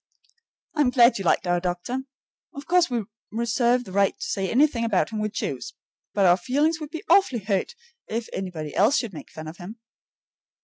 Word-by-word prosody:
I 300 Hz, -, +1 dB
am 270 Hz, -, +4 dB
glad 240 Hz, -3 st, +5 dB
you 195 Hz, -, -5 dB
liked -, -, +2 dB
our 175 Hz, 0 st, +1 dB
doctor. 180 Hz, +8 st, -3 dB, 0.6 s
Of 280 Hz, 0 st, -8 dB
course 355 Hz, -2 st, +3 dB
we 240 Hz, -3 st, -1 dB, 0.3 s
reserve 235 Hz, +2 st, +1 dB
the 190 Hz, -, -11 dB
right 195 Hz, +1 st, +2 dB
to -, -, -5 dB
say 195 Hz, -1 st, -2 dB
anything 260 Hz, -2 st, +3 dB
about 225 Hz, -2 st, +1 dB
him 215 Hz, -, -3 dB
we 215 Hz, 0 st, -1 dB
choose, 215 Hz, -, -4 dB, 0.4 s
but 200 Hz, -2 st, +3 dB
our 175 Hz, 0 st, +6 dB
feelings 295 Hz, -, +1 dB
would 305 Hz, -2 st, -6 dB
be 325 Hz, +4 st, -7 dB
awfully 265 Hz, -, +3 dB
hurt 205 Hz, -, -1 dB, 0.3 s
if 225 Hz, +1 st, -3 dB
anybody 165 Hz, -6 st, -5 dB
else 220 Hz, +8 st, +4 dB
should 230 Hz, -6 st, -2 dB
make 155 Hz, -, -9 dB
fun 155 Hz, 0 st, -9 dB
of 160 Hz, +2 st, -9 dB
him. 190 Hz, +5 st, -9 dB
225 Hz, 195 wpm, -25 LUFS, 190-260 Hz, 0.6 s, our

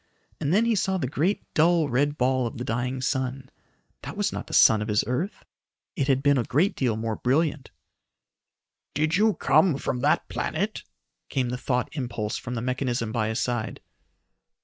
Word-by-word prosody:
And 150 Hz, -1 st, -1 dB
then 215 Hz, +6 st, +4 dB
he 235 Hz, -, +2 dB
saw 190 Hz, -2 st, +1 dB
the 175 Hz, -, -1 dB
great 160 Hz, +10 st, 0 dB
dull 165 Hz, 0 st, +3 dB
red 145 Hz, +4 st, +1 dB
ball 130 Hz, -1 st, +1 dB
of -, -, -7 dB
the 120 Hz, -, -4 dB
dying 125 Hz, +2 st, -2 dB
sun. 130 Hz, 0 st, -2 dB, 0.5 s
That -, -, -8 dB
was -, -, 0 dB
not -, -, -5 dB
the -, -, -10 dB
sun 110 Hz, -1 st, +6 dB
of 105 Hz, -, -3 dB
his 105 Hz, -1 st, +2 dB
earth. 125 Hz, -, -3 dB, 0.5 s
It 140 Hz, -7 st, 0 dB
had 135 Hz, -1 st, +2 dB
been 140 Hz, -2 st, +4 dB
a -, -, +1 dB
great 150 Hz, +11 st, +1 dB
deal 120 Hz, -5 st, 0 dB
more 110 Hz, -1 st, -2 dB
brilliant. 145 Hz, +1 st, 0 dB, 1.3 s
"Did 155 Hz, +3 st, +1 dB
you 215 Hz, +2 st, +3 dB
come 170 Hz, -8 st, +3 dB
from 125 Hz, -, -2 dB
that 150 Hz, +5 st, +2 dB
planet?" 205 Hz, +7 st, -2 dB, 0.5 s
came 130 Hz, -3 st, 0 dB
the 125 Hz, -, -2 dB
thought 125 Hz, -1 st, -1 dB
impulse 120 Hz, -6 st, -3 dB
from 125 Hz, -, -5 dB
the 115 Hz, -, -3 dB
mechanism 125 Hz, -3 st, -1 dB
by 110 Hz, -2 st, 0 dB
his 110 Hz, +2 st, -1 dB
side. 120 Hz, -3 st, -2 dB
130 Hz, 185 wpm, -26 LUFS, 120-155 Hz, 1.3 s, sun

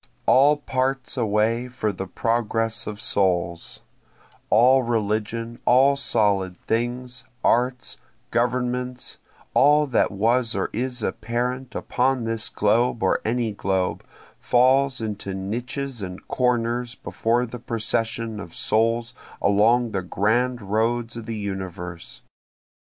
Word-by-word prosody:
All 145 Hz, +3 st, +5 dB
parts 135 Hz, -1 st, -2 dB
away 115 Hz, +1 st, +1 dB
for 125 Hz, -4 st, -2 dB
the 95 Hz, 0 st, -6 dB
progress 115 Hz, +1 st, -1 dB
of 105 Hz, -1 st, -5 dB
souls, 90 Hz, -4 st, 0 dB, 0.7 s
All 125 Hz, +4 st, +6 dB
religion, 115 Hz, 0 st, -2 dB
all 135 Hz, +3 st, +5 dB
solid 100 Hz, -8 st, +1 dB
things, 120 Hz, +1 st, -2 dB, 0.2 s
arts, 125 Hz, +1 st, +1 dB, 0.3 s
governments 125 Hz, +1 st, -1 dB, 0.3 s
all 150 Hz, +2 st, +5 dB
that 130 Hz, -5 st, +2 dB
was 115 Hz, +4 st, +1 dB
or 95 Hz, -, -1 dB
is 125 Hz, 0 st, -3 dB
apparent 125 Hz, +5 st, -2 dB
upon 130 Hz, 0 st, 0 dB
this 115 Hz, -1 st, -2 dB
globe 115 Hz, +2 st, +1 dB
or 95 Hz, -, +2 dB
any 115 Hz, 0 st, 0 dB
globe, 95 Hz, -2 st, -1 dB, 0.4 s
falls 130 Hz, +1 st, +3 dB
into 105 Hz, -3 st, -4 dB
niches 120 Hz, +6 st, -4 dB
and 90 Hz, -1 st, -7 dB
corners 120 Hz, -1 st, 0 dB
before 120 Hz, 0 st, 0 dB
the 125 Hz, +1 st, -8 dB
procession 115 Hz, -1 st, -2 dB
of 85 Hz, -4 st, -9 dB
souls 115 Hz, +2 st, +1 dB, 0.3 s
along 110 Hz, +4 st, +3 dB
the 95 Hz, -, -1 dB
grand 110 Hz, +6 st, 0 dB
roads 115 Hz, +4 st, 0 dB
of 115 Hz, -1 st, -7 dB
the 115 Hz, -1 st, -3 dB
universe. 95 Hz, -4 st, -6 dB
115 Hz, 115 wpm, -24 LUFS, 105-125 Hz, 0.7 s, All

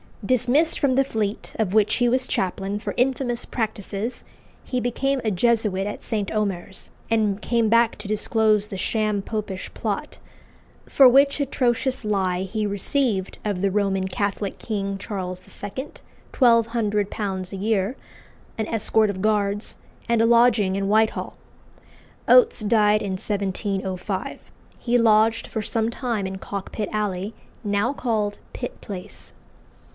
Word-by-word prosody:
Dismissed 255 Hz, +8 st, +3 dB
from 270 Hz, -3 st, +2 dB
the 270 Hz, -, +4 dB
Fleet, 220 Hz, -5 st, -3 dB
of 210 Hz, -4 st, 0 dB
which 215 Hz, -1 st, +4 dB
he 245 Hz, -, +2 dB
was 255 Hz, +1 st, +1 dB
chaplain, 195 Hz, +2 st, -2 dB
for -, -, -4 dB
infamous 250 Hz, -1 st, 0 dB
practices, 220 Hz, 0 st, -3 dB, 0.4 s
he 250 Hz, -, -2 dB
became 265 Hz, +3 st, 0 dB
a 220 Hz, -, +1 dB
Jesuit 210 Hz, -1 st, +1 dB
at 205 Hz, -, -5 dB
St. 210 Hz, -3 st, -2 dB
Omer's, 195 Hz, -3 st, -3 dB, 0.2 s
and 215 Hz, -3 st, +1 dB
came 230 Hz, -2 st, +1 dB
back 230 Hz, 0 st, +3 dB
to 210 Hz, -, -6 dB
disclose 215 Hz, 0 st, +2 dB
the 195 Hz, -, -6 dB
sham 210 Hz, +1 st, 0 dB
Popish 205 Hz, -2 st, -5 dB
plot, -, -, -3 dB, 0.7 s
for 270 Hz, -, +7 dB
which 275 Hz, +3 st, +5 dB
atrocious 255 Hz, -2 st, 0 dB
lie 190 Hz, -3 st, 0 dB
he 210 Hz, +2 st, -2 dB
received 205 Hz, 0 st, 0 dB
of 200 Hz, -4 st, -1 dB
the 200 Hz, -, +2 dB
Roman 195 Hz, -1 st, 0 dB
Catholic 200 Hz, +1 st, -2 dB
king, 200 Hz, -3 st, -3 dB
Charles 185 Hz, -3 st, -5 dB, 0.2 s
II., 260 Hz, +8 st, -5 dB, 0.4 s
£1200 210 Hz, -5 st, +1 dB
a -, -, -4 dB
year, 210 Hz, +3 st, 0 dB, 0.6 s
an 220 Hz, -1 st, -2 dB
escort 220 Hz, -1 st, +2 dB
of 190 Hz, -2 st, -4 dB
guards, 205 Hz, 0 st, 0 dB, 0.3 s
and 235 Hz, -1 st, +3 dB
a -, -, +4 dB
lodging 230 Hz, -4 st, +4 dB
in 195 Hz, 0 st, -1 dB
Whitehall. 220 Hz, +2 st, +1 dB, 0.9 s
Oates 470 Hz, -, +6 dB
died 210 Hz, -1 st, +3 dB
in 195 Hz, -2 st, -2 dB
1705. 190 Hz, -1 st, -3 dB, 0.4 s
He 245 Hz, 0 st, +2 dB
lodged 225 Hz, 0 st, +4 dB
for 220 Hz, -, -4 dB
some 225 Hz, +2 st, -1 dB
time 235 Hz, -5 st, -2 dB
in 190 Hz, 0 st, -4 dB
Cockpit 200 Hz, +2 st, -5 dB
Alley, 205 Hz, -1 st, -2 dB, 0.3 s
now 205 Hz, +5 st, 0 dB
called 215 Hz, -6 st, -1 dB
Pitt -, -, -6 dB
Place. 185 Hz, -3 st, -9 dB
215 Hz, 140 wpm, -23 LUFS, 195-235 Hz, 0.9 s, for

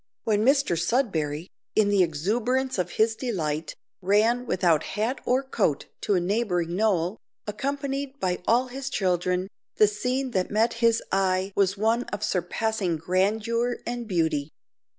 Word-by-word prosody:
When 215 Hz, -1 st, +1 dB
Mr 275 Hz, -6 st, +3 dB
Sudberry, 165 Hz, -, 0 dB, 0.3 s
in 210 Hz, -2 st, +4 dB
the 200 Hz, -2 st, +4 dB
exuberance 225 Hz, -, 0 dB
of 180 Hz, -1 st, 0 dB
his 220 Hz, +1 st, +2 dB
delight, 160 Hz, -, -3 dB, 0.3 s
ran 220 Hz, +6 st, +2 dB
without 170 Hz, -6 st, +2 dB
hat 225 Hz, +5 st, -2 dB
or 255 Hz, +2 st, +2 dB
coat 205 Hz, -, 0 dB, 0.2 s
to 205 Hz, -, +1 dB
a -, -, +3 dB
neighbouring 180 Hz, -3 st, 0 dB
knoll, 190 Hz, -2 st, +1 dB, 0.3 s
accompanied 275 Hz, +4 st, -3 dB
by 180 Hz, -1 st, -1 dB
all 250 Hz, +2 st, +3 dB
his 270 Hz, +2 st, -5 dB
children, 180 Hz, -4 st, 0 dB, 0.3 s
the 215 Hz, -, +6 dB
scene 250 Hz, +5 st, -2 dB
that 185 Hz, -4 st, 0 dB
met 225 Hz, +3 st, +2 dB
his 230 Hz, -1 st, +3 dB
eye 190 Hz, 0 st, +1 dB
was 195 Hz, 0 st, +2 dB
one 225 Hz, +4 st, +1 dB
of 205 Hz, 0 st, -5 dB
surpassing 190 Hz, 0 st, -1 dB
grandeur 220 Hz, +8 st, 0 dB
and 240 Hz, -1 st, -4 dB
beauty. 160 Hz, -6 st, 0 dB
210 Hz, 145 wpm, -26 LUFS, 180-240 Hz, 0.3 s, the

